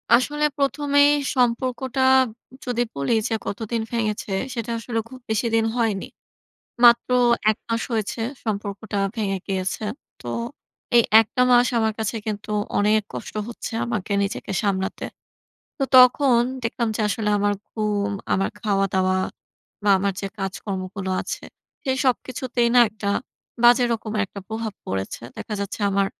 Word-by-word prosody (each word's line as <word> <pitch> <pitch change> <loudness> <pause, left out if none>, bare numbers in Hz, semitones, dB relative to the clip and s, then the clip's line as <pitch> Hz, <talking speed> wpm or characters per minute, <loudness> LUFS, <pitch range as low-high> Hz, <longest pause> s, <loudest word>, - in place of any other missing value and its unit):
আসলে 295 +5 +1
প্রথমেই 285 0 +3 0.3
সম্পর্কটা 255 +1 0 0.6
যদি 245 -1 -1
বলি 140 +8 0 0.2
যে - - -1
কতদিন 225 +2 -3
ভেঙেছে, 215 -3 -2 0.2
সেটা 235 -1 -4
আসলে 230 0 -2
খুব 260 +2 -11
বেশিদিন 225 +1 +1
হয়নি। 225 -5 0 0.8
মাত্র 235 +1 +6 0.4
১ 215 - -6
মাস 230 0 0
হয়েছে 225 0 -2 0.2
সম্পর্কটা 205 -1 -3 0.2
ভেঙে 200 -4 -1
গিয়েছে। 190 +1 -2 0.4
তো - - -9 0.7
এই 235 - +7 0.2
১ 225 - +2
টা 250 - +3
মাস 245 0 +6
আমার 220 -1 +1
কাছে 220 +1 -1
কিন্তু 210 0 -4 0.3
অনেক 210 +1 +3
কষ্ট - - -7 0.2
হচ্ছে 235 - -6
আমাকে, 215 -4 -3
নিজেকে 200 0 -4
সামলাতে। 190 -2 -1 0.7
তো 275 - 0
তখন 255 0 +6 0.2
দেখলাম 235 0 -1
যে - - -1
আসলে 210 0 -1
আমার 205 0 +2 0.2
ঘুম, 210 -2 -1 0.2
আমার 195 +1 +1
খাওয়া-দাওয়া 195 -3 +1 0.7
বা 205 - +2
আমার 200 +1 0
যে 195 - -2
কাজকর্মগুলো 195 0 -4
আছে, - - -5 0.4
সেই 265 -3 0
সবকিছুতেই 250 -1 0
না - - +8
একটা 210 -1 -6 0.6
বাজে 240 +1 +7
রকমের 215 -2 -2
একটা 200 - -9
প্রভাব 220 -1 -4
পড়েছে। 95 0 -4 0.2
দেখা 215 - -5
যাচ্ছে 200 +2 -4
আমার 200 0 +2
220 Hz, 135 wpm, -23 LUFS, 200-240 Hz, 0.8 s, না